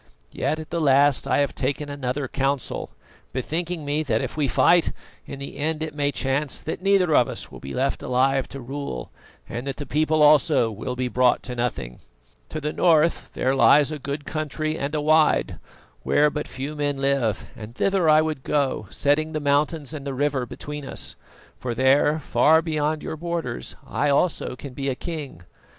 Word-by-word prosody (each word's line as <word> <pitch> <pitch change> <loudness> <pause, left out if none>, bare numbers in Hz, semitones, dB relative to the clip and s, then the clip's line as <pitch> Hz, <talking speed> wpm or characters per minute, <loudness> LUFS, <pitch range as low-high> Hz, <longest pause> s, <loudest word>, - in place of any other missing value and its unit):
Yet, 155 - -1
at 155 - -9
the 170 0 -1
last, 140 -1 +4
I - - +2
have 140 - 0
taken 140 +2 -2
another 140 -1 -3
council, 135 -1 -2 0.4
bethinking 160 +5 -3
me 145 +2 0
that, 115 -8 0
if - - -4
we 150 -2 +1
fight, 170 +6 +4 0.3
in 140 - -7
the 140 0 -8
end 155 +1 -1
it 155 -2 -5
may 145 -1 0
chance 135 +1 -1
that 160 - -5
neither 190 -4 +3
of 120 - +5
us - - -6
will - - -10
be 70 - -7
left 135 +2 0
alive 135 +1 +1
to 135 - -8
rule, 130 - -5 0.4
and 120 +4 -5
that 135 - -2
the 145 - -6
people 155 +1 +2
also 150 -5 +5
will 125 +4 -5
be 125 0 -1
brought 125 0 +2
to 125 - -6
nothing. 120 - -3 0.5
To 155 - -4
the 150 0 -3
north 165 -1 +3
there 130 - +1
lies 145 +2 +5
a 155 - -4
good 140 +2 -5
country 155 0 -2
and 145 0 -3
a 150 - 0
wide, 155 +1 +3 0.4
where 150 - +3
but 150 0 -4
few 135 +3 -5
men 145 -1 -1
live, 135 -6 0
and 110 +2 -10
thither 190 -2 +2
I 155 0 +6
would 155 -4 -3
go, 135 -7 0
setting 155 +3 +1
the 155 - -1
mountains 145 +1 0
and 150 -3 -6
the 135 - -3
river 135 -2 0
between 150 +4 -7
us; - - -6 0.4
for 120 -2 -3
there, 135 +4 +4
far 160 +1 +3
beyond 155 -1 -1
your 160 - -5
borders, 170 -7 -4
I 145 +2 0
also 140 -2 +1
can 135 0 -9
be 135 +1 -2
a 130 - -1
king. 145 - -6
145 Hz, 190 wpm, -24 LUFS, 130-155 Hz, 0.5 s, I